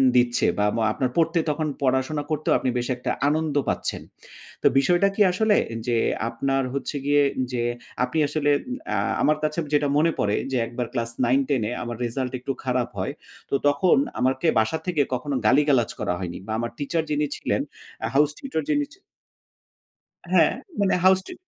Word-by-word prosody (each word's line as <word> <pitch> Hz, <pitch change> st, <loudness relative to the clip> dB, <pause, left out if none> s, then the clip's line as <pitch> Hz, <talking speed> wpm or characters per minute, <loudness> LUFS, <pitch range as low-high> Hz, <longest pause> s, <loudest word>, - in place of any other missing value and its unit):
দিচ্ছে, 120 Hz, -1 st, +3 dB
বা 105 Hz, -, +2 dB, 0.3 s
আপনার 130 Hz, -1 st, -1 dB
পড়তে 165 Hz, +1 st, +3 dB
তখন 155 Hz, +1 st, -1 dB, 0.2 s
পড়াশোনা 130 Hz, +3 st, +1 dB
করতেও 155 Hz, 0 st, +1 dB
আপনি 130 Hz, -, -1 dB
বেশ 120 Hz, -, -1 dB
একটা 125 Hz, +1 st, -3 dB, 0.2 s
আনন্দ 155 Hz, -1 st, 0 dB
পাচ্ছেন। -, -, -2 dB, 0.6 s
তো -, -, +6 dB
বিষয়টা 175 Hz, +7 st, +3 dB
কি 210 Hz, -, 0 dB
আসলে 210 Hz, +3 st, +2 dB, 0.3 s
যে 120 Hz, -1 st, +2 dB, 0.3 s
আপনার 135 Hz, +3 st, 0 dB
হচ্ছে 140 Hz, +1 st, -3 dB
গিয়ে 145 Hz, 0 st, +4 dB, 0.3 s
যে, 120 Hz, -1 st, -1 dB, 0.4 s
আপনি 145 Hz, -, -2 dB
আসলে 145 Hz, 0 st, +1 dB, 0.4 s
আ -, -, +1 dB, 0.2 s
আমার 150 Hz, 0 st, +3 dB
কাছে 155 Hz, +2 st, 0 dB
যেটা 145 Hz, 0 st, +3 dB
মনে 165 Hz, +2 st, +3 dB
পড়ে 105 Hz, 0 st, +1 dB, 0.2 s
যে 130 Hz, -, +1 dB
একবার 120 Hz, 0 st, -4 dB
ক্লাস 115 Hz, -1 st, -1 dB
9-10 135 Hz, 0 st, +2 dB
এ -, -, -4 dB
আমার 120 Hz, -1 st, -5 dB
রেজাল্ট 125 Hz, +2 st, -2 dB
একটু 130 Hz, -, -3 dB
খারাপ 125 Hz, -2 st, 0 dB
হয়। -, -, -2 dB, 0.4 s
তো -, -, +1 dB
তখন 145 Hz, +5 st, +4 dB, 0.2 s
আমাকে 130 Hz, +5 st, +1 dB
বাসা 110 Hz, +9 st, +1 dB
থেকে 170 Hz, -5 st, +1 dB
কখনো 135 Hz, +3 st, -2 dB
গালিগালাজ 135 Hz, -2 st, +4 dB
করা -, -, -1 dB
হয়নি। 90 Hz, -2 st, -5 dB
বা 110 Hz, -, -6 dB
আমার 120 Hz, 0 st, -3 dB
টিচার 160 Hz, +3 st, -1 dB
যিনি 150 Hz, 0 st, +1 dB
ছিলেন -, -, -1 dB, 0.5 s
house 150 Hz, +1 st, +4 dB
tutor 275 Hz, -, -3 dB
যিনি 290 Hz, -1 st, +2 dB
ছি 390 Hz, -, -20 dB, 1.3 s
হ্যাঁ -, -, +5 dB, 0.3 s
মানে 200 Hz, -1 st, +3 dB
হাউস 190 Hz, 0 st, +6 dB
টি -, -, -7 dB
140 Hz, 170 wpm, -24 LUFS, 125-155 Hz, 1.3 s, তো